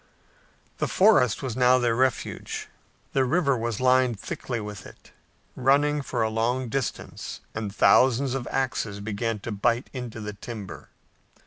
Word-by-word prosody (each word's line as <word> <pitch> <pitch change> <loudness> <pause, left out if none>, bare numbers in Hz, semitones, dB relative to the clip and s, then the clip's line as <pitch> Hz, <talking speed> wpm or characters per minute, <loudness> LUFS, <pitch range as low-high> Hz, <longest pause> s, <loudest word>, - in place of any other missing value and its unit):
The - - 0
forest 165 - +4
was 125 -4 -3
now 125 0 +5
their 120 -2 +1
refuge. 130 -1 -1 0.5
The 135 - +3
river 140 +1 +2
was 115 -2 -2
lined 130 -3 +3
thickly 120 +3 -4
with 105 -2 -7
it, - - -17 0.4
running 145 +2 +3
for 125 -4 -1
a 110 - +1
long 120 +3 0
distance, 135 0 -4
and 110 -2 -4
thousands 130 +4 +4
of 135 -2 -3
axes 120 -6 -2
began 110 +2 -2
to 115 - -5
bite 115 +5 0
into 125 -4 -6
the 105 -1 -5
timber. 105 -2 -8
120 Hz, 145 wpm, -26 LUFS, 110-130 Hz, 0.5 s, now